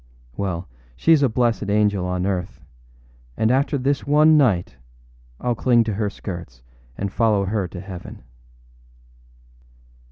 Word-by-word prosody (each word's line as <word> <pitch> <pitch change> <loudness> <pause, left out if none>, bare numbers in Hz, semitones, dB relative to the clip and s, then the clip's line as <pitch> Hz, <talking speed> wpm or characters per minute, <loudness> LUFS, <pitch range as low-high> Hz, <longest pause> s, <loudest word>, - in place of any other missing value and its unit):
Well, 90 -1 -3 0.3
sheâs 160 -3 +4
a 135 - +3
blessed 115 -3 0
angel 105 -3 +1
on 90 0 -2
earth; 90 -4 -3 0.8
and 110 +1 +2
after 140 +2 +1
this 140 +2 0
one 155 +2 +5
night 100 - +2 0.6
Iâll 120 -1 -1
cling 120 0 +3
to 110 -1 -3
her 105 +1 -1
skirts 85 - -8 0.3
and 100 -1 -4
follow 105 -2 +2
her 100 -1 -1
to 90 - -9
heaven. 95 -8 -9
105 Hz, 130 wpm, -22 LUFS, 95-125 Hz, 0.8 s, one